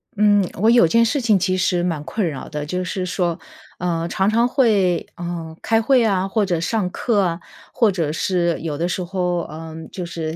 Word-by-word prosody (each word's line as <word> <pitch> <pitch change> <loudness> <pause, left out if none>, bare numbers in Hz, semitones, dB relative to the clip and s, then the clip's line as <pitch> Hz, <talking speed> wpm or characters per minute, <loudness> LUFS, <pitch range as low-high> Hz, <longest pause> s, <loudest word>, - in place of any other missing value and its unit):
嗯， 205 -2 +4
我 220 - +4
有 235 -8 +6
件 230 +7 +4
事 285 +6 0
情 220 -4 +3
其 185 0 0
实 180 -1 +1
蛮 165 -4 -2
困 175 +5 -2
扰 140 -5 -5
的。 150 -1 -4
就 180 +4 -2
是 185 +1 -3
说， 175 -2 -1 0.4
呃， 170 -1 -1
常 190 +3 +1
常 230 +2 +3
会 205 - +2
呃， 170 -2 -6
开 225 0 +2
会 250 +1 +4
啊， 195 -4 +1
或 205 +1 +1
者 175 -4 -1
上 185 +3 -1
课 210 +2 0
啊， 170 -2 -1 0.3
或 225 -4 +3
者 165 -5 -1
是 175 0 0
有 155 -3 -3
的 170 - -1
时 180 +1 -2
候， 180 -1 -1
呃， 160 0 -8 0.2
就 180 - -5
是 165 -2 -4
180 Hz, 220 characters per minute, -21 LUFS, 170-205 Hz, 0.4 s, 有